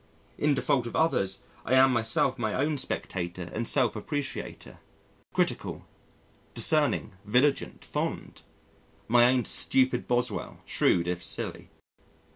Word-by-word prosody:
In 145 -1 +2
default 125 -2 +1
of - - -7
others, 100 -12 +1 0.2
I 130 - +1
am 130 0 +6
myself 120 +3 +1
my 110 -3 -1
own 145 +2 0
spectator 90 -8 -4
and 115 +1 -1
self 130 -5 +3
appreciator 145 +6 -5 0.5
critical, - - -1 0.7
discerning, - - +2
vigilant, 125 +7 +1
fond! - - -4 0.7
my 120 +1 +5
own 125 -1 +3
stupid 130 -2 +2
Boswell, 120 0 -1
shrewd 85 0 +2
if 90 0 -2
silly. - - -4
125 Hz, 115 wpm, -28 LUFS, 105-135 Hz, 0.7 s, am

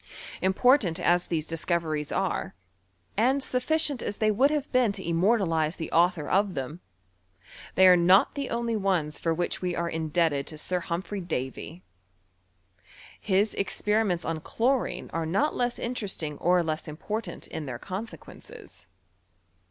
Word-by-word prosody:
Important 190 - +3
as 175 0 +2
these 160 -3 -1
discoveries 165 -2 -2
are, - - -2 0.6
and 260 +5 +2
sufficient 280 +1 0
as 205 - -3
they 215 -1 +2
would 260 +7 +4
have 295 -2 -2
been 250 -4 +3
to 190 -3 -7
immortalize 170 -3 +2
the 160 - -6
author 170 -2 +2
of 195 -1 +1
them, 135 +5 -5 1.0
they 190 - +7
are 180 - +8
not 180 +3 +5
the 280 -2 -4
only 235 -1 -1
ones 185 -7 0
for 165 - 0
which 175 +2 -1
we 180 -1 -1
are 170 - -1
indebted 160 -3 0
to 155 - -8
Sir 180 +4 -1
Humphry 185 +4 -4
Davy. 125 - -5 1.4
His 200 +1 +1
experi 210 +2 +1
ments 175 -2 -1
on 165 -1 -2
chlorine 245 - -1
are 165 -1 -1
not 240 - +1
less 245 0 -1
interesting 200 -11 -3
or 180 0 +3
less 160 0 -3
im 150 0 -7
portant 215 +6 -5
in 150 - -6
their 125 -2 -4
consequences. 195 - -9
180 Hz, 150 wpm, -27 LUFS, 160-220 Hz, 1.4 s, are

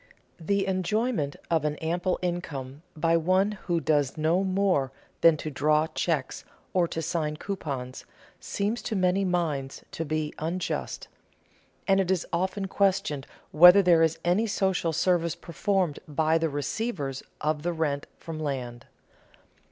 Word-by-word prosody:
The 195 +4 0
enjoyment 190 - 0 0.2
of 160 -3 +2
an 150 0 0
ample 175 +4 -1
income 145 -6 -4 0.2
by 165 +2 +3
one 185 +5 +2
who 170 -2 +1
does 145 -3 +1
no 165 +5 +2
more 185 -8 +1 0.3
than 165 -2 +6
to 155 - -5
draw 150 +2 +2
checks 160 -3 -2 0.3
or 180 -2 +3
to 165 0 -4
sign 155 -2 -2
coupons 140 -10 -5 0.3
seems 210 +4 -2
to 220 - -3
many 185 +1 +2
minds 160 -7 -2
to 165 - -3
be 155 -1 -2
unjust; 170 +4 -3 0.8
and 195 -1 +4
it 190 -2 0
is 185 -3 +1
often 190 +3 -1
questioned 185 -8 0 0.2
whether 180 +5 +8
there 170 -2 +5
is 160 0 +2
any 190 +6 +2
social 190 -4 0
service 170 0 +1
performed 180 -2 -1
by 155 +2 +2
the 165 0 0
receivers 145 - -3 0.2
of 150 0 -1
the 175 +3 -1
rent 150 -4 -2
from 160 -2 -7
land. 125 -5 -4
165 Hz, 145 wpm, -27 LUFS, 150-185 Hz, 0.8 s, whether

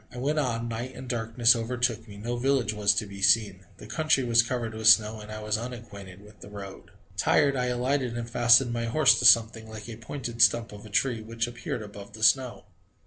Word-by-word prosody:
I 120 - -11
went 145 +5 -1
on: 120 -4 -2
night 120 +3 -6
and 130 - -9
darkness 115 0 +2
overtook 115 -1 -2
me. 100 -1 -12
No 120 +4 -4
village 130 -2 0
was 105 -1 +1
to 105 - -1
be 100 -1 -11
seen. 95 -3 +2
The - - -12
country 155 -4 0
was 115 -1 +4
covered 120 -1 -4
with 110 0 -2
snow 110 0 +5
and 105 0 -11
I 110 0 -7
was 105 0 -1
unacquainted 100 -6 -10
with 105 +1 -18
the - - -12
road. 100 -2 -10 0.3
Tired, 140 -1 +2
I 125 -1 -1
alighted 125 0 -2
and 120 -1 -5
fastened 120 +1 +4
my 115 0 -3
horse 135 +5 +3
to 125 - -1
something, 115 -1 +4
like 110 0 -10
a 115 -2 -8
pointed 120 0 -6
stump 115 -1 +3
of 105 +1 -12
a - - -13
tree, 115 +2 0
which 115 +1 -4
appeared 120 -1 -6
above 100 -1 -12
the 110 - -8
snow. 125 -3 +2
115 Hz, 220 wpm, -26 LUFS, 110-125 Hz, 0.3 s, snow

